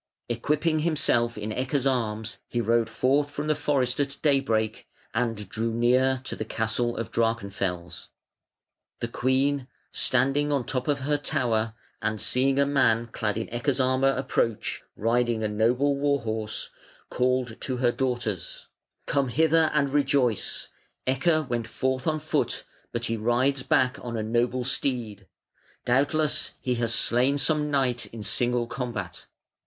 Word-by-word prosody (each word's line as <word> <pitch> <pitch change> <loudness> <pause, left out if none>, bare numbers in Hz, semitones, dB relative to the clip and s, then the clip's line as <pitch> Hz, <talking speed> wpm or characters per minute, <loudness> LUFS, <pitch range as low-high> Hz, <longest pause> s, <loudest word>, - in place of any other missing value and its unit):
Equipping 150 +7 +1
himself 145 -8 +1
in 105 +1 -4
Ecke's 130 +3 -1
arms 110 -4 -1
he 120 - -2
rode 115 -1 +2
forth 135 +6 +2
from 145 +1 -4
the 155 - +2
forest 135 -4 0
at 140 0 -1
daybreak, 115 -7 +1 0.3
and 115 -3 -1
drew 115 +4 -2
near 125 +3 +3
to - - -4
the - - -3
castle 110 +2 -1
of 115 - -4
Drachenfels. 100 -6 -2 0.9
The 115 - -2
queen, 130 +3 +1 0.2
standing 135 +4 +2
on 140 -3 +1
the - - -20
top 130 -1 -2
of 145 -2 +1
her 145 +2 +1
tower, 115 -5 0 0.3
and 110 0 -1
seeing 135 +4 +1
a 140 - +4
man 120 -5 +2
clad 105 -1 -1
in 110 - -2
Ecke's 125 +3 0
armour 130 +1 +3
approach, 125 -4 -1
riding 115 0 +1
a - - +1
noble 120 +7 +2
war 140 0 +1
horse, 110 -1 -3 0.4
called 125 -2 0
to 130 -2 -2
her 120 -1 +3
daughters: 120 -8 -3 0.4
"Come 140 -2 +1
hither 160 +4 +3
and 140 -2 +1
rejoice. 135 -5 +1 0.4
Ecke 155 +4 +2
went 120 -2 -2
forth 130 +3 -1
on 155 -1 +2
foot, 155 0 -1 0.3
but 120 0 -2
he 115 0 -1
rides 125 +5 +1
back 130 +1 +2
on 115 -1 -4
a 110 - -1
noble 120 +3 0
steed. 120 -7 -1 0.6
Doubtless 145 +4 +1
he 125 - -1
has 115 -1 +1
slain 125 +4 +2
some 150 +1 +2
knight 130 -4 +1
in 115 -2 -8
single 120 +2 +1
combat". 115 -8 -5
125 Hz, 150 wpm, -26 LUFS, 115-140 Hz, 0.9 s, a